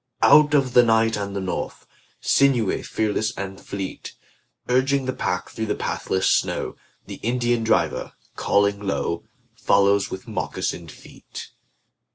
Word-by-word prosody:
Out 150 0 +6
of 135 -3 +2
the 125 - +8
night 115 -1 +3
and 100 -1 -4
the - - -1
north, 95 -1 -4 0.4
Sinewy, 125 -7 +2
fearless 110 +2 -1
and 95 0 -6
fleet, 100 -1 -6 0.5
Urging 130 +2 +2
the 130 - -1
pack 90 0 -2
through 110 0 -4
the - - 0
pathless 95 - -1
snow, - - 0 0.3
The - - -9
Indian 120 0 0
driver, 110 - 0 0.2
calling 100 0 +2
low, 85 -2 -2 0.3
Follows 100 0 +2
with 95 - -7
moccasined 85 -2 -3
feet. - - -11
110 Hz, 135 wpm, -23 LUFS, 100-125 Hz, 0.5 s, the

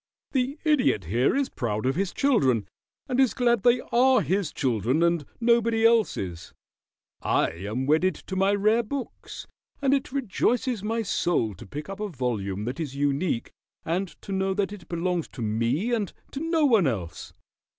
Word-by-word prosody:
The 265 +2 0
Idiot 285 - +2
here 120 - +2
is 275 -1 +1
proud 110 -2 -3
of 130 - +2
his 195 +1 -1
children, 130 - +2 0.4
and 255 -1 -1
is 265 -3 +3
glad 240 -3 +2
they 245 +2 +4
are 255 +2 +5
his 180 +1 0
children 125 - 0
and 170 -2 +2 0.2
nobody 230 -1 +3
else's. 150 - +1 0.7
I - - +1
am 105 +10 -4
wedded 160 +5 +2
to 190 - -7
my 195 +1 +3
rare 215 +3 +3
books, 260 +3 -6 0.3
and 275 -1 +2
it 275 -2 0
rejoices 245 -2 0
my 225 +2 -1
soul 170 - 0
to 90 - -12
pick 150 +8 -7
up 195 +1 -7
a 210 -1 -3
volume 110 - -3
that 125 +6 -4
is 145 -5 -4
unique, 140 -1 -1 0.3
and 180 +4 -1 0.2
to - - -7
know 190 0 0
that 200 0 -1
it 190 -5 -12
belongs 175 0 -1
to 120 - -5
me 115 - 0
and 210 -6 -1 0.2
to 275 - -5
no 325 0 +1
one 220 - +4
else. 90 -10 -4
190 Hz, 170 wpm, -26 LUFS, -, 0.7 s, are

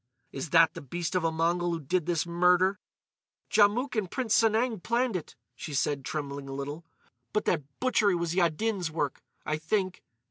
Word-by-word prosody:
"Is 135 +3 -5
that 165 +1 +5
the - - -8
beast 170 +6 -4
of 185 -2 +1
a 165 - +2
Mongol 170 +2 +1
who 165 - -2
did 170 +3 -1
this 170 -2 +1
murder?" 180 +3 +3 0.7
"Djamouk 220 +6 +3
and 210 -5 -1
Prince 240 -1 -1
Sanang 225 0 +2
planned 235 +2 0
it," 170 - -5 0.2
she 150 - -6
said, 140 0 0
trembling 140 -1 -5
a - - -5
little. 145 +4 -5 0.5
"But 210 - 0
that 150 -6 +1
butchery 220 -6 +3
was 170 -1 -1
Yaddin's 180 +2 +1
work, 150 -3 -2 0.2
I 155 - -1
think. 185 +3 -1
175 Hz, 175 wpm, -28 LUFS, 155-205 Hz, 0.7 s, that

